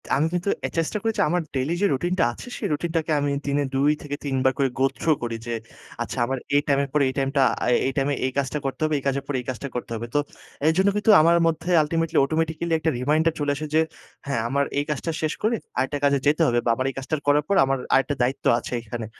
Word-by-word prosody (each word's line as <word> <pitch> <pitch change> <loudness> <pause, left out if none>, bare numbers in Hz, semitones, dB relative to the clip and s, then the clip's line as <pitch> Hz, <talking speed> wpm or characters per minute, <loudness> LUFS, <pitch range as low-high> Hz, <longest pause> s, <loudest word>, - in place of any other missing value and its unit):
আমি 150 +4 +2
কিন্তু 175 +3 -1 0.2
আ - - +1
চেষ্টা 165 +5 0
করি, 225 0 +1 0.2
আমার 175 +2 +1
ডেইলি 135 +6 0
যে - - +4
রুটিনটা 175 +6 0
আছে, - - -11
সেই - - -2
রুটিনটাকে 165 0 -2
আমি 145 - 0 0.2
দিনে 145 0 +1
২-৩ 145 0 0
বার 130 - +3
করে 135 -2 +2
go 135 - +4
through 155 -3 +2
করি 115 -1 -2
যে, 120 - -2 0.5
"আচ্ছা, 120 - -4
আমার 130 +2 -2 0.2
এই 145 - +5
টাইমের 140 0 +2
পরে 150 - +3
এই - - -4
টাইমটা, 135 +1 +1 0.2
আ - - 0 0.2
এই - - 0
টাইমে 140 +1 +1
এই 130 - 0
কাজটা 140 +2 -1
করতে 135 +2 -3
হবে, 155 0 +1
এই - - -14
কাজের 140 0 0
পর 145 - -3
এই 125 - -16
কাজটা 130 +2 -4
করতে 120 - -5
হবে।" 115 +1 -4
তো 145 - +5 0.5
এইজন্য 185 +5 +3 0.3
আমার 170 +1 +5
মধ্যে 165 +2 -2
ultimately, 165 +1 -1
automatically 160 +2 -1
একটা 160 - +1
reminder 155 +5 +2
চলে 145 -1 0
আসে 155 - -4
যে, - - +6 0.5
"হ্যাঁ, 140 -5 0
আমার 140 +1 +1
এই 145 - +1
কাজটা 150 +3 -2
শেষ 155 0 0
করে 230 +2 +2 0.2
আরেকটা 145 +2 0
কাজে 140 0 +4
যেতে 150 +3 +3
হবে, 120 0 +2
বা 120 - +2
আমার 130 +2 -2
এই 135 - -7
কাজটা 135 +4 -2
করার 145 0 +4
পর 200 - +1
আমার 135 0 0 0.2
আরেকটা 135 +2 +3
দায়িত্ব 130 +2 -2
আছে 125 - -7
এইখানে।" 115 0 -6
145 Hz, 230 wpm, -24 LUFS, 135-160 Hz, 0.5 s, যে